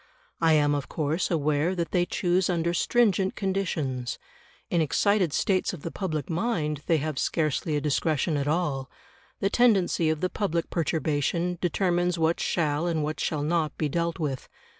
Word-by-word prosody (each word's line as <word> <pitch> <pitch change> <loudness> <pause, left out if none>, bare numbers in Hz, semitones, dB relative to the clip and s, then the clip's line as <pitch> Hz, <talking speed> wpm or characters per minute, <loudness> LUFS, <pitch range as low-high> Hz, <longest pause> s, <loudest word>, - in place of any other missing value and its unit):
I 165 -1 +5
am 145 -1 +3
of 145 -2 -3
course 155 +3 -1
aware 155 +2 +1
that 170 -3 -2
they 175 -1 +2
choose 180 0 +1
under 170 -1 0
stringent 195 -1 +2
conditions. 160 - -2 0.5
In 170 - +3
excited 185 +3 +2
states 185 +5 +1
of 165 - -9
the 165 - -4
public 155 -8 -3
mind 160 - -1
they 165 - +4
have 150 -2 -3
scarcely 155 -1 0
a 145 - 0
discretion 150 +1 0
at 140 0 -1
all; 150 -4 -1 0.5
the 195 - +1
tendency 195 -9 +3
of 155 -1 0
the 185 - +1
public 170 -6 -2
perturbation 165 +2 0
determines 175 -1 +1
what 165 +1 +1
shall 155 0 0
and 160 -3 0
what 155 +1 -3
shall 150 -2 -1
not 155 0 0
be 155 - 0
dealt 170 +3 -1
with. 145 -6 -3
165 Hz, 165 wpm, -26 LUFS, 150-180 Hz, 0.5 s, I